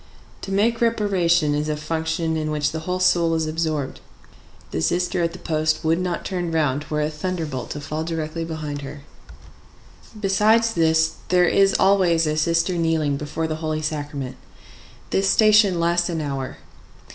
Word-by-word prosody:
To 195 - -6
make 225 +4 +1
reparation 180 -9 +2
is 150 +1 -1
a 150 - -1
function 160 +1 -2
in 155 -1 -2
which 150 -1 0
the 160 - -4
whole 180 0 -1
soul 170 -3 +3
is 160 -1 0
absorbed. 155 -3 -2 0.7
The 80 - -2
sister 180 - 0
at 170 0 0
the 180 - -9
post 155 -1 -1
would 165 +2 +2
not 180 -2 -3
turn 175 -3 -3
round 150 -3 0
were 150 0 -1
a 150 - 0
thunderbolt 155 -5 -4
to 145 - -5
fall 155 +2 -4
directly 165 0 -3
behind 155 -3 -5
her. 140 +1 -8 1.2
Besides 220 +3 +3
this, 160 -1 +2
there 180 -1 +4
is 195 +2 +3
always 180 -4 +3
a 155 0 0
sister 165 +3 +1
kneeling 160 -3 +1
before 150 +3 -3
the 155 -1 -3
Holy 155 -1 -3
Sacrament. 145 -4 -4 0.7
This 195 0 +2
station 215 -4 +5
lasts 170 +1 +1
an 165 -2 -2
hour. 135 -3 -4
160 Hz, 165 wpm, -22 LUFS, 155-180 Hz, 1.2 s, station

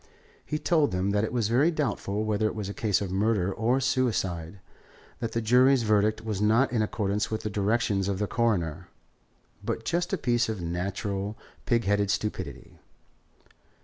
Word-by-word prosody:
He 150 - -3
told 155 -2 +2
them 95 +2 0
that 105 +1 +1
it 110 - -1
was 120 -3 0
very 130 +8 +3
doubtful 110 -9 -1
whether 110 0 +1
it - - -4
was 105 -3 -4
a 100 - -5
case 105 -3 0
of 95 -2 -3
murder 100 -1 +1
or 120 +6 +1
suicide; 100 -10 -1 0.6
that 115 -1 -3
the 115 - -1
jury's 125 +3 +5
verdict 110 0 +2
was 105 -3 -2
not 110 +5 +3
in 115 - +2
accordance 105 -1 -1
with 110 - -2
the 105 - -3
directions 100 -1 +1
of 100 -2 -1
the 105 - 0
Coroner, 95 -8 -1 0.8
but 115 +1 -3
just 175 +2 -1
a 195 - +1
piece 120 -5 +1
of 110 -3 -3
natural, 95 +4 -3 0.3
pig 115 -2 +2
headed 100 0 +1
stupidity. 105 +2 -4
105 Hz, 175 wpm, -27 LUFS, 100-120 Hz, 0.8 s, jury's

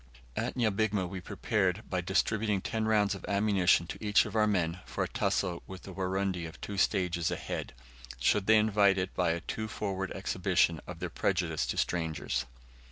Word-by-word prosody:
At - - -2
Nyabigma 110 -5 +1
we 90 0 -6
prepared, 100 +1 0
by 90 -1 -1
distributing 105 +3 +1
ten 110 +3 -2
rounds 105 -2 +3
of 95 - -8
ammunition 100 -4 +3
to 90 - -8
each 105 0 +4
of - - -7
our 105 -1 +4
men, 90 -4 0
for - - -3
a - - -2
tussle 85 -1 -1
with 95 -1 -9
the 95 - -9
Warundi 95 -2 -1
of 80 - -12
two 100 - -5
stages 90 -3 +1
ahead, - - -4 0.5
should 100 -2 +2
they 110 0 +7
invite 105 -2 +4
it 90 0 -2
by 90 -2 +1
a 85 +1 0
too 110 +3 -4
forward 95 -3 -3
exhibition 95 -3 +1
of - - -7
their - - -3
prejudice - - 0
to - - -2
strangers. 80 -7 -1
95 Hz, 180 wpm, -31 LUFS, 90-105 Hz, 0.5 s, they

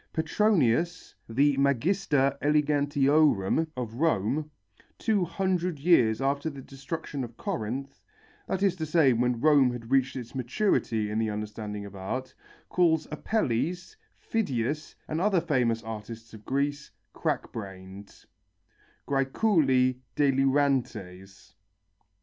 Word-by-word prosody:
Petronius, 170 - +1 0.2
the 140 +5 +3
magister 140 0 +2
elegantiorum 145 -3 +2
of 120 -3 -4
Rome, 150 +1 0 0.5
two 210 -4 +1
hundred 180 -1 -1
years 135 -8 +3
after 140 +3 0
the 140 -3 -9
destruction 135 +1 -6
of 120 -1 -9
Corinth, 130 +6 -4 0.5
that 190 +1 -1
is 195 -3 +3
to 160 - -2
say 155 -4 +4
when 120 0 0
Rome 145 -3 +5
had 120 0 -8
reached 135 -1 +2
its 120 -3 -7
maturity 120 - 0
in 110 - -1
the 110 -1 0
understanding 105 0 -5
of 100 -1 -10
art, 130 +8 -5 0.3
calls 160 -3 +2
Apelles, 175 - -1 0.2
Phidias 150 - -2
and 155 +2 -2
other 195 -2 +3
famous 125 -8 0
artists 115 +1 -8
of 105 -1 -12
Greece, 145 +1 -1 0.2
crack - - -2
brained 95 -1 -10 0.8
(græculi 135 - +2 0.2
delirantes). 130 -9 0
135 Hz, 115 wpm, -27 LUFS, 115-155 Hz, 0.8 s, Rome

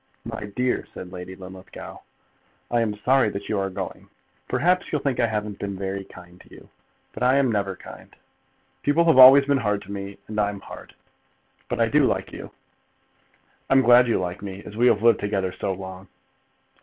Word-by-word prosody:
"My - - -6
dear," 125 0 -1
said 90 - -8
Lady 90 0 -8
Linlithgow, 95 0 -11 0.7
"I 120 -1 +2
am 105 -2 -1
sorry 125 +2 +2
that 100 0 -6
you 105 - 0
are 95 0 -1
going. 90 - -7 0.4
Perhaps 180 +3 +1
you'll 150 - -1
think 135 -3 -1
I 120 - +3
haven't 105 -2 -4
been 100 -1 -4
very 95 0 -4
kind 90 -1 -15
to - - -20
you, - - -15 0.4
but - - -9
I 130 +2 +4
never 105 -6 0
am - - -13
kind. - - -13 0.7
People 160 +4 +2
have 160 -5 +5
always 135 +2 +10
been 140 -1 +2
hard 105 -3 -1
to 100 - -11
me, 100 0 -6
and 105 0 -4
I'm 100 -1 -1
hard. - - -12 0.7
But - - -3
I - - +3
do - - +3
like - - -1
you." - - -8 1.2
"I'm 135 0 +5
glad 120 +1 +6
you 115 - +1
like 90 -1 -4
me, 100 -1 -7
as 105 - -10
we 120 +3 +3
have 110 -3 +3
lived 115 0 +5
together 100 -2 -1
so 100 - -3
long." 95 0 -8
105 Hz, 195 wpm, -24 LUFS, 95-125 Hz, 1.2 s, always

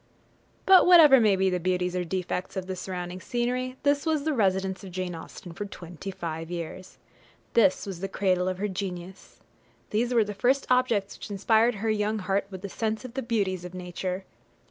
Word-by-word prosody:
jpg] - - -36
But 380 -2 +7
whatever 315 -7 +9
may 215 -4 +4
be 190 0 +2
the 180 - 0
beauties 180 0 -1
or 180 - 0
defects 180 +1 -3
of 185 - -3
the 190 0 -4
surrounding 180 0 -5
scenery, 250 +3 -2
this 285 0 +2
was 315 -3 0
the 310 0 0
residence 190 -4 0
of 195 - -8
Jane 185 0 -3
Austen 170 +2 -9
for 205 +5 -5
twenty 180 -2 -8
five 165 -3 -5
years. 175 +2 -7 0.6
This 195 -5 +3
was 190 -4 -6
the 195 - -3
cradle 185 -2 +1
of 185 -1 -1
her 205 +2 -1
genius. 185 -1 -7 0.5
These 235 +3 +1
were 235 -3 +4
the 210 0 -5
first 255 +7 +1
objects 235 -6 +2
which - - -8
inspired 220 +4 +3
her 220 +2 -2
young 215 0 0
heart 195 0 -1
with 190 0 -8
a - - -2
sense 220 +4 -2
of 245 - -8
the 265 - -2
beauties 200 -7 -1
of 180 0 -8
nature. 180 +1 -4
195 Hz, 200 wpm, -27 LUFS, 180-230 Hz, 0.6 s, whatever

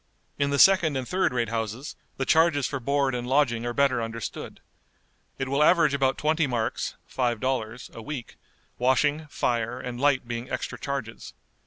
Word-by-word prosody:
In 140 0 +2
the 140 - 0
second 170 -5 +5
and 130 -2 -4
third 185 0 +1
rate 120 -3 -1
houses 115 +5 -4 0.2
the 135 - -1
charges 160 -3 +3
for 135 - -2
board 140 +1 +1
and 120 0 -3
lodging 125 -4 +2
are - - -1
better 130 -1 +2
understood. 115 -1 -6 0.8
It 135 - -2
will 140 +2 0
average 165 -3 +5
about 135 -1 +1
twenty 155 0 +1
marks 120 -3 -2
(five 120 -3 -1
dollars) 125 -2 -3
a 115 - -8
week, 135 -1 -7 0.4
washing, 145 +5 +2
fire, 120 -3 -1
and 125 0 -6
light 140 -4 +2
being 120 +1 -5
extra 125 -1 -4
charges. 135 -5 -5
130 Hz, 170 wpm, -26 LUFS, 120-145 Hz, 0.8 s, second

